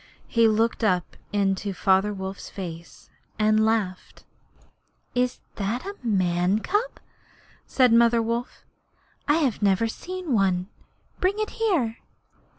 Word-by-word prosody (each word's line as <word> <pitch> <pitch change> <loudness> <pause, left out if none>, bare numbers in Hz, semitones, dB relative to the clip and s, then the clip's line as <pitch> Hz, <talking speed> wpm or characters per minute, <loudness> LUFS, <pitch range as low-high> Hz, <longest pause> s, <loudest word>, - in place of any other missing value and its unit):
He 230 -1 +4
looked 225 +2 +1
up 180 -5 +1 0.2
into 200 0 0
Father 195 +2 +3
Wolf's 190 -1 -6
face, 170 -3 -9 0.3
and 215 0 +3
laughed. 215 -5 -1 0.9
'Is 250 0 0 0.2
that 225 - -2
a 400 - -4
man's 185 -3 +1
cub?' 430 +5 -1 0.7
said 250 -3 +4
Mother 235 0 +5
Wolf. 235 +2 -3 0.6
'I 295 - +4
have 280 -10 0
never 200 +2 +3
seen 360 +5 -5
one. 190 -3 +1 0.5
Bring 380 +3 +1
it 430 0 -2
here.' 330 - 0
220 Hz, 120 wpm, -25 LUFS, 195-250 Hz, 0.9 s, Mother